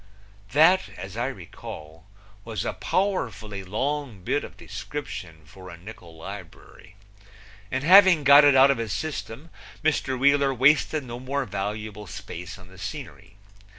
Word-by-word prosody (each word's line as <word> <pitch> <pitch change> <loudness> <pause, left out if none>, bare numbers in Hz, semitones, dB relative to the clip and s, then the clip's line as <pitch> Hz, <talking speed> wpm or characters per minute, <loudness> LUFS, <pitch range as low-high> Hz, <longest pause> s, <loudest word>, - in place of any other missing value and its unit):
That, 160 0 +5
as 95 +2 -8
I 120 +2 -1
recall, 80 - -10 0.4
was 110 -2 -4
a - - -2
powerfully 115 - -2
long 125 +1 -3
bit - - 0
of - - -10
description 95 - -7
for 95 +4 -13
a 85 - -10
nickul 90 -3 -12
librury, 95 +1 -11 0.7
and 130 +4 -2
having 185 -2 +7
got 140 +2 +8
it 145 -2 +6
out 135 +1 +7
of 135 - -1
his 110 -4 -3
system 155 +1 -5 0.3
Mr. 145 -4 0
Wheeler 140 0 +3
wasted 145 +3 +3
no 120 -1 -7
more 135 +2 -2
valuable 105 0 -5
space 90 -1 -8
on 90 -2 -15
the 95 0 -16
scenery. 95 +1 -8
115 Hz, 145 wpm, -25 LUFS, 95-140 Hz, 0.7 s, got